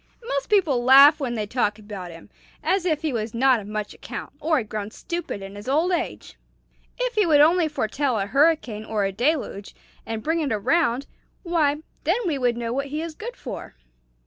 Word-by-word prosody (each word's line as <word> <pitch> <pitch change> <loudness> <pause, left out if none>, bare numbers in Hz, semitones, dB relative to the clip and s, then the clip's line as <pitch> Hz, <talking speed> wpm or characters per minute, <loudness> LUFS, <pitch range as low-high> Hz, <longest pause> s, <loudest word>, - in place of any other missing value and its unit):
Most 275 -1 -2
people 315 -12 +3
laugh 275 +4 +8
when 250 -4 -2
they 215 -2 -2
talk 210 -1 0
about 205 -4 -8
him, 165 -1 -13 0.3
as 380 -2 +1
if 315 -3 0
he 310 -4 -1
was 225 0 -3
not 255 0 +4
of 200 - -9
much 210 0 -4
account, - - -8
or 320 0 +1
had 225 -5 -2
grown 210 -1 -4
stupid 340 - -5
in 195 0 -8
his 205 +2 -10
old 320 +7 +2
age. 350 0 -3 0.6
If - - -1
he 425 -5 +2
would 300 -3 +5
only 325 +3 +5
foretell 270 -2 -1
a 195 - 0
hurricane 275 -3 +2
or 215 -2 -1
a 195 - -1
deluge, 240 -2 -1 0.3
and 225 -1 -5
bring 325 +1 0
it 295 -4 -1
around, 255 +4 +1 0.4
why, 315 -4 +1 0.2
then 345 +7 +2
we 305 -6 0
would 245 -2 +1
know 235 -1 -3
what 275 +2 -2
he 300 +2 -4
is 330 -1 -5
good 470 +9 -7
for." 250 - -8
270 Hz, 200 wpm, -24 LUFS, 215-320 Hz, 0.6 s, laugh